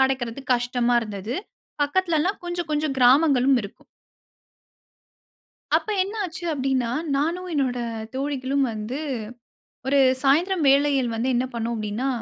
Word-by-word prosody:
கிடைக்கிறது 265 -1 0
கஷ்டமா 245 0 +1
இருந்தது. 210 +1 -5 0.5
பக்கத்தில 335 +2 +1
எல்லாம் 380 +6 -1
கொஞ்சம் 350 -1 -3
கொஞ்சம் 300 -2 0
கிராமங்களும் 265 +1 +5
இருக்கும். 200 - -11 1.9
அப்ப - - 0
என்ன 395 - -6
ஆச்சு 360 +1 -8
அப்படின்னா 265 -3 0 0.3
நானும் 335 +6 -1
என்னோட 260 -4 0 0.4
தோழிகளும் 275 0 -1
வந்து 220 +5 -5 0.9
ஒரு 280 +1 +3 0.2
சாயந்திரம் 330 +5 +2
வேளையில் 275 -3 +3
வந்து 230 +3 -1
என்ன 245 +1 +1
பண்ணினோம் 235 0 -2
அப்படின்னா, 215 +4 -2
270 Hz, 120 wpm, -24 LUFS, 245-300 Hz, 1.9 s, கிராமங்களும்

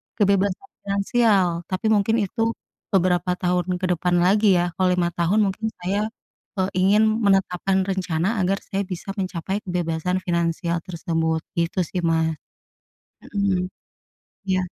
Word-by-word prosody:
kebebasan 200 - +1 0.2
finansial. 200 -1 +3 0.2
Tapi 195 +4 0
mungkin 215 +1 +3
itu 225 +3 -1 0.4
beberapa 180 -1 +2
tahun 180 0 0
ke 185 - -2
depan 180 0 +1
lagi 200 +1 +4
ya. 175 0 0
Kalau 185 -1 +3
5 175 -1 +1
tahun 175 +5 +1
mungkin 200 +3 -2
saya, 200 +4 -1 0.5
eee, 190 0 +1
ingin 200 +4 +4 0.2
menetapkan 190 -1 +2
rencana 190 +2 0
agar 190 +2 +1
saya 195 +1 -2
bisa 185 +1 -7
mencapai 190 +1 -3
kebebasan 175 0 -1
finansial 170 0 0
tersebut. 165 -2 -1 0.2
Gitu 170 +2 0
sih, 180 +3 -3
Mas. 160 -1 +2 1.0
Mhm. 190 -3 +1 0.8
Iya. 185 0 +2
185 Hz, 130 wpm, -23 LUFS, 175-200 Hz, 1.0 s, lagi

